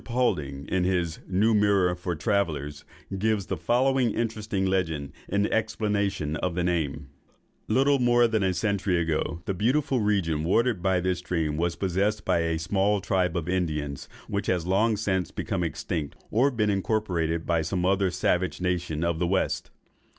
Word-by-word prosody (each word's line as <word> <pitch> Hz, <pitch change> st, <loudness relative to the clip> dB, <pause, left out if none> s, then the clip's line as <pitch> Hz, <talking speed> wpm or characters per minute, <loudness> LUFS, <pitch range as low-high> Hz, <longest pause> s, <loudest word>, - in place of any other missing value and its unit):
Poulding, 75 Hz, -, -1 dB
in 95 Hz, -1 st, 0 dB
his 90 Hz, -3 st, 0 dB
"New 105 Hz, +5 st, +2 dB
Mirror 100 Hz, -4 st, +3 dB
for 90 Hz, 0 st, -3 dB
Travellers," 75 Hz, -6 st, -1 dB, 0.4 s
gives 110 Hz, -1 st, +1 dB
the -, -, -2 dB
following 130 Hz, 0 st, +2 dB
interesting 110 Hz, -4 st, -1 dB
legend 80 Hz, -7 st, -1 dB, 0.2 s
in 100 Hz, +1 st, +1 dB
explanation 105 Hz, -8 st, 0 dB
of 90 Hz, 0 st, -2 dB
the 90 Hz, -, 0 dB
name:— 75 Hz, -5 st, -1 dB, 0.6 s
"Little 140 Hz, +1 st, +3 dB
more 120 Hz, -1 st, +4 dB
than 110 Hz, -2 st, 0 dB
a 95 Hz, -1 st, +2 dB
century 100 Hz, -4 st, 0 dB
ago, 80 Hz, 0 st, -1 dB
the 95 Hz, -, -1 dB
beautiful 130 Hz, +7 st, +1 dB
region 95 Hz, -8 st, +1 dB
watered 115 Hz, +3 st, +2 dB
by 95 Hz, -1 st, +2 dB
this 90 Hz, 0 st, 0 dB
stream 80 Hz, -4 st, -1 dB
was 85 Hz, +2 st, 0 dB
possessed 95 Hz, +4 st, 0 dB
by -, -, +2 dB
a 80 Hz, 0 st, 0 dB
small 100 Hz, +5 st, +1 dB
tribe 90 Hz, -2 st, 0 dB
of 85 Hz, -1 st, -3 dB
Indians, 75 Hz, -6 st, -2 dB, 0.2 s
which -, -, -2 dB
has 90 Hz, -3 st, 0 dB
long 105 Hz, +4 st, +2 dB
since 95 Hz, -3 st, -1 dB
become 95 Hz, -3 st, -3 dB
extinct, 80 Hz, -1 st, -3 dB, 0.2 s
or 125 Hz, +6 st, +4 dB
been 110 Hz, -5 st, +1 dB
incorporated 90 Hz, -5 st, -1 dB
with 80 Hz, -2 st, +1 dB
some 90 Hz, 0 st, -1 dB
other 95 Hz, 0 st, +2 dB
savage 90 Hz, 0 st, 0 dB
nation 90 Hz, -3 st, -1 dB
of 85 Hz, -1 st, 0 dB
the 90 Hz, -, +1 dB
West. 95 Hz, +1 st, 0 dB
95 Hz, 165 wpm, -26 LUFS, 85-105 Hz, 0.6 s, more